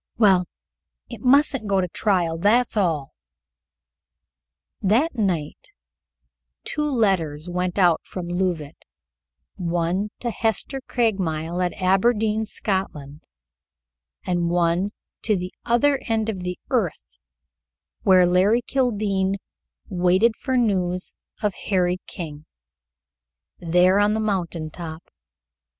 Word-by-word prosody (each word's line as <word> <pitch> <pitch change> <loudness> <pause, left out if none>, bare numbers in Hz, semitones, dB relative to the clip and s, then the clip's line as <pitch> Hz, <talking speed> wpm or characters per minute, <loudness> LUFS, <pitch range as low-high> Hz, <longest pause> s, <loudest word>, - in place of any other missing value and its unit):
"Well, 190 -5 +5 0.6
it 235 -4 -8
mustn't 270 -2 +3
go 195 -1 +2
to 185 - +1
a - - -5
trial, 175 -4 0
that's 230 +7 +3
all." 160 -9 0 1.7
That 235 - +2
night 185 - -3 0.9
two - - -2
letters 190 - 0
went 180 +1 -2
out 175 -4 +4
from 180 -2 -6
Leauvite, 175 -4 -3 0.7
one 175 +2 -1
to 240 - -1
Hester 230 +5 -1
Craigmile 180 -7 -1
at 180 - -1
Aberdeen, 215 +3 +2
Scotland, 155 -9 -3 1.0
and 175 -2 0
one 175 +2 +1 0.3
to 215 - +1
the 180 0 -4
other 275 +4 +3
end 225 -1 0
of 200 -4 -3
the 180 0 -4
earth, 155 - -2 0.8
where 185 -2 +5
Larry 190 +7 +3
Kildene 205 -7 0 0.5
waited 185 +4 +2
for 260 -2 -1
news 185 -6 0 0.3
of 210 -2 +1 0.2
Harry 180 -2 +2
King, 150 -3 -7 1.1
there 180 +3 +3
on 205 +1 +3
the - - 0
mountain 175 -7 -2
top. 160 -1 -8
190 Hz, 110 wpm, -23 LUFS, 175-220 Hz, 1.7 s, Well